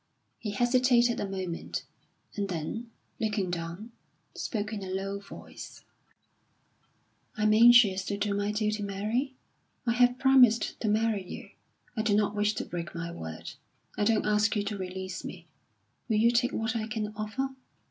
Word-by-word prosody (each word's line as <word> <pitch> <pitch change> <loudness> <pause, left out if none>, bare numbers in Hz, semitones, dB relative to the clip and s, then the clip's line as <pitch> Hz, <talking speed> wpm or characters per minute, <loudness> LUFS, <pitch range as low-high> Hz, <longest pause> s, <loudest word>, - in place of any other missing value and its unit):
He 215 - -4
hesitated 240 +2 +3
a 200 - -2
moment, 185 -3 -4 0.5
and 200 -1 -2
then, 185 +8 -4 0.3
looking 210 -5 -1
down, 175 +6 -5 0.4
spoke 215 -1 -3
in 205 - -4
a 190 - -6
low 195 +1 -3
voice: 200 - -11 1.5
"I 215 - -1
am 215 0 +5
anxious 225 -4 +7
to 200 - -2
do 205 0 0
my 205 +1 0
duty, 210 0 -1
Mary. 215 +7 -2 0.5
I 235 - +2
have 245 +1 +4
promised 255 -4 +5
to 220 - 0
marry 215 -1 +1
you. 180 - -9 0.4
I 220 - 0
do 215 -2 +2
not 210 0 +2
wish 210 0 +1
to - - -3
break 170 -1 -6
my 170 0 -4
word. 80 - -7 0.4
I - - 0
don't 220 0 +2
ask 210 +1 +2
you 205 - +1
to 205 +1 -3
release 185 0 -5
me. - - -8 0.6
Will 220 - +2
you 230 +2 +5
take 245 +1 +2
what 225 +1 -1
I 220 -1 -1
can 215 -2 -3
offer? 220 +6 -2
210 Hz, 165 wpm, -29 LUFS, 195-230 Hz, 1.5 s, anxious